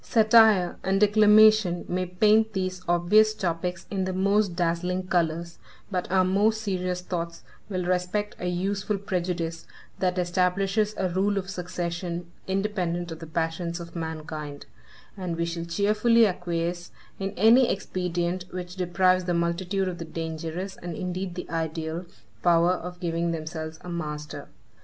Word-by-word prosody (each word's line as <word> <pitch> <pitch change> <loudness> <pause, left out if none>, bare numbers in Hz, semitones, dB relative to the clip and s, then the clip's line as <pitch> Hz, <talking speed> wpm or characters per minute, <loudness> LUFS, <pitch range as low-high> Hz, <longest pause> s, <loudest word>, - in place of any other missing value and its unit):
Satire 220 -5 +5
and 195 +1 +1
declamation 210 -3 +5
may 185 +1 -1
paint 215 +4 +3
these 185 -1 -2
obvious 210 +6 +4
topics 180 -2 -2
in 190 -2 -1
the 185 - -2
most 200 0 +2
dazzling 180 +1 -1
colors, 170 -1 -1 0.3
but 180 -2 -2
our 185 -1 +4
more 200 +4 +3
serious 185 -4 -2
thoughts 170 -2 -4 0.3
will 185 -3 -2
respect 185 +3 -1
a 180 - -3
useful 195 +3 -1
prejudice, 175 -4 -3 0.3
that 180 -1 0
establishes 190 +4 +1
a 190 -1 0
rule 195 +3 +1
of 190 0 -3
succession, 175 -1 -4 0.2
independent 185 -3 -1
of 160 - -7
the 165 - -8
passions 165 +2 -2
of 170 0 -9
mankind; 155 -3 -5 0.5
and 180 -4 -4
we 170 - 0
shall 170 0 -4
cheerfully 210 +6 +3
acquiesce 175 -2 -2 0.3
in 195 0 -2
any 235 +6 +6
expedient 180 -2 -2
which 180 -1 -6
deprives 185 0 +2
the 175 -1 0
multitude 175 +3 0
of 180 -1 -4
the - - -4
dangerous, 165 +3 -5
and 175 -1 -6
indeed 180 0 -4
the 180 - -6
ideal, 160 +1 -3 0.3
power 170 0 +4
of 180 0 -4
giving 170 -1 -1
themselves 160 -1 -5
a 180 - -7
master. 150 -3 -5
180 Hz, 145 wpm, -26 LUFS, 170-195 Hz, 0.5 s, any